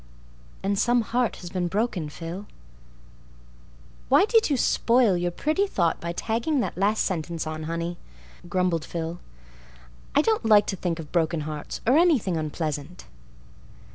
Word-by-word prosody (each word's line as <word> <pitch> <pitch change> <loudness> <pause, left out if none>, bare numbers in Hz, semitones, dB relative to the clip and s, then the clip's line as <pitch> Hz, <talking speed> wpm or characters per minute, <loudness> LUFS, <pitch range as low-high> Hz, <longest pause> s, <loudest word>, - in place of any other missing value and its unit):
And 200 0 0
some 240 +1 +3
heart 240 +2 0
has 175 -1 -8
been 180 -2 -1
broken, 195 -5 -1
Phil." 170 +6 -7 1.6
"Why - - +6
did 445 -3 +3
you 280 - +2
spoil 235 -3 +3
your 175 0 0
pretty 310 - 0
thought 170 - 0
by 170 - -3
tagging 230 - -1
that - - -3
last 205 +4 +2
sentence 170 -3 -3
on, 155 0 -5
honey?" 170 +1 -3 0.5
grumbled 180 -3 +1
Phil. 165 +1 -5 1.0
"I 290 - +5
don't 440 +3 +1
like 210 -2 +6
to 195 - -2
think 175 -2 -2
of 160 -3 -9
broken 165 -2 +1
hearts—or 155 - -2
anything 285 - +3
unpleasant." 155 0 -4
180 Hz, 140 wpm, -25 LUFS, 165-230 Hz, 1.6 s, Why